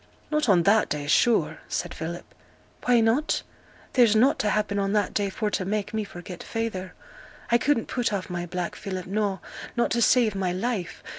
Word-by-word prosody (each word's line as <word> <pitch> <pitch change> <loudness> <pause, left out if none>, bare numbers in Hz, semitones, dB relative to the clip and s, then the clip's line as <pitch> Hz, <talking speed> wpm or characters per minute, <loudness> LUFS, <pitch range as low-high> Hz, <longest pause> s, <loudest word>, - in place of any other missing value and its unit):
'Not 300 -5 +1
on 180 -4 +5
that 210 +4 +4
day, 150 -1 -2
sure!' 225 +10 +3
said - - -3
Philip. - - -5 0.6
'Why 245 -1 +5
not? 235 +8 +1 0.5
There's 235 -4 +5
nought 255 +6 +4
t' 215 - +1
happen 210 -1 0
on 195 0 0
that 205 -2 +1
day 200 -1 0
for 210 +2 -2
t' 190 - -1
make 205 +2 -2
me 220 -1 0
forget 180 -2 -9
feyther. 205 -5 -4 0.6
I 235 - +5
couldn't 280 -4 +1
put 245 -3 -1
off 195 -3 -2
my 175 -1 -4
black, 175 0 -3
Philip, 185 -2 -5
no, 200 -1 -1 0.4
not 235 - +2
to 235 - +1
save 230 -2 +4
my 190 -2 -1
life! 190 -1 -3
210 Hz, 190 wpm, -26 LUFS, 185-230 Hz, 0.6 s, on